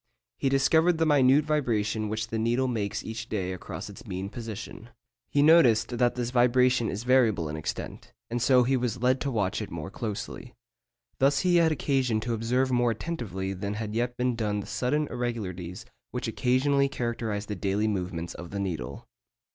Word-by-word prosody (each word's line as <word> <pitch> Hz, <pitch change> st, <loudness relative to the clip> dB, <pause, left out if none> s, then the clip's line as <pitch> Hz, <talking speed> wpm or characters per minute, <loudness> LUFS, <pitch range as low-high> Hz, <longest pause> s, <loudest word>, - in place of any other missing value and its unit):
He 135 Hz, -, +1 dB
discovered 160 Hz, +5 st, +3 dB
the 165 Hz, -, +2 dB
minute 145 Hz, -1 st, +5 dB
vibration 110 Hz, -8 st, 0 dB
which 110 Hz, +1 st, -3 dB
the 115 Hz, -, -2 dB
needle 120 Hz, +4 st, +1 dB
makes 105 Hz, -5 st, -2 dB
each 110 Hz, +1 st, -6 dB
day 95 Hz, -3 st, -2 dB
across 90 Hz, -, -7 dB
its -, -, -11 dB
mean 95 Hz, +2 st, -4 dB
position. 115 Hz, 0 st, -8 dB, 0.4 s
He 145 Hz, -, +3 dB
noticed 125 Hz, -7 st, +5 dB
that 120 Hz, -1 st, +3 dB
this 120 Hz, -1 st, -2 dB
vibration 125 Hz, -1 st, +3 dB
is 105 Hz, +4 st, -4 dB
variable 120 Hz, -9 st, +3 dB
in 75 Hz, -, -4 dB
extent, 80 Hz, -, -6 dB, 0.2 s
and 120 Hz, +1 st, -3 dB
so 125 Hz, 0 st, +5 dB
he 130 Hz, +2 st, +2 dB
was 125 Hz, -2 st, -2 dB
led 130 Hz, +1 st, +3 dB
to 140 Hz, -, -1 dB
watch 105 Hz, -4 st, -1 dB
it 105 Hz, -, -5 dB
more 85 Hz, +2 st, -6 dB
closely. 115 Hz, +3 st, -6 dB, 0.6 s
Thus 135 Hz, +2 st, +3 dB
he 180 Hz, -1 st, +3 dB
had 165 Hz, -1 st, +4 dB
occasion 135 Hz, -6 st, +1 dB
to 120 Hz, +2 st, -2 dB
observe 125 Hz, +4 st, 0 dB
more 120 Hz, -1 st, +3 dB
attentively 110 Hz, -, -3 dB
than 100 Hz, +2 st, -4 dB
had 105 Hz, -1 st, -4 dB
yet 120 Hz, +2 st, -1 dB
been 125 Hz, -1 st, 0 dB
done 105 Hz, -2 st, -1 dB
the 100 Hz, -, -5 dB
sudden 150 Hz, +5 st, 0 dB
irregularities 110 Hz, -5 st, -4 dB, 0.2 s
which 125 Hz, -1 st, -4 dB
occasionally 135 Hz, +4 st, +2 dB
characterise 115 Hz, -5 st, -3 dB
the 105 Hz, -, -4 dB
daily 100 Hz, +3 st, 0 dB
movements 90 Hz, -4 st, -3 dB
of 85 Hz, 0 st, -9 dB
the 100 Hz, -, -4 dB
needle. 85 Hz, -11 st, -4 dB
120 Hz, 180 wpm, -27 LUFS, 105-130 Hz, 0.6 s, minute